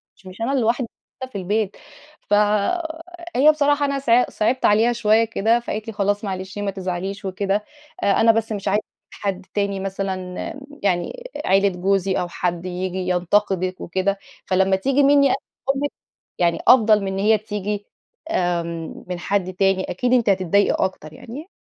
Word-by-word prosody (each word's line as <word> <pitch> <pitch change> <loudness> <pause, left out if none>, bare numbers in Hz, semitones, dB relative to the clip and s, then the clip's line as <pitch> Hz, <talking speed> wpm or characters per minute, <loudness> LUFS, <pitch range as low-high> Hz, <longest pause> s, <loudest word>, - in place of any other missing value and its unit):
مش - - -25
مش 185 +4 -11
أنا 235 +4 0
لوحدي 235 +1 +1
اللي - - -50 0.3
موجودة 260 - -6
في - - -3
البيت. 205 +2 -1 0.5
فهي 320 - +1
بصراحة 290 -1 +2
أنا 280 -1 -1
ص 270 - -6 0.2
صعبت 235 +4 0
عليها 225 +3 +4
شويّة 225 -1 +3
كده، 225 +1 +2
فقالت 220 -2 -5
لي: 225 - -5
"خلاص 205 0 0
معلش 190 0 -5
ما 205 -1 -1
تزعليش 190 +1 -4
وكده. 195 +2 -1 0.4
أ 200 - +3
أنا 225 0 +7
بس 225 0 -1
مش 205 -2 -4
عايزة 205 +2 +2 0.3
حد 195 -2 -4
تاني 200 -1 -1
مثلًا" 195 0 -2 0.4
امم، 275 - -11 0.2
يعني 200 - -1 0.2
عيلة 195 +1 +4
جوزي 190 +1 0
"أو 180 - -2
حد 175 0 -3
ييجي 185 0 -3
ينتقدك 185 +1 +1
وكده. 190 +3 -1 0.3
فلما 190 +1 +3
تييجي 270 +9 +2
مِنّي 280 0 +5
أنا - - +3 0.4
أمك 285 +1 -1 0.5
يعني 170 -1 +2
أفضل 220 -4 +6
من - - -2
إن 190 - -3
هي 215 +2 +4
تييجي 205 -1 -4 0.5
آمم، 170 - -2
من 180 -1 -4
حد 185 0 -1
تاني، 195 0 +2
أكيد 245 +7 0
أنتِ 235 -4 +3
هتتضايقي 195 +1 +3
أكتر 155 -5 -6
يعني. 260 - -9
200 Hz, 165 wpm, -22 LUFS, 185-230 Hz, 0.5 s, أنا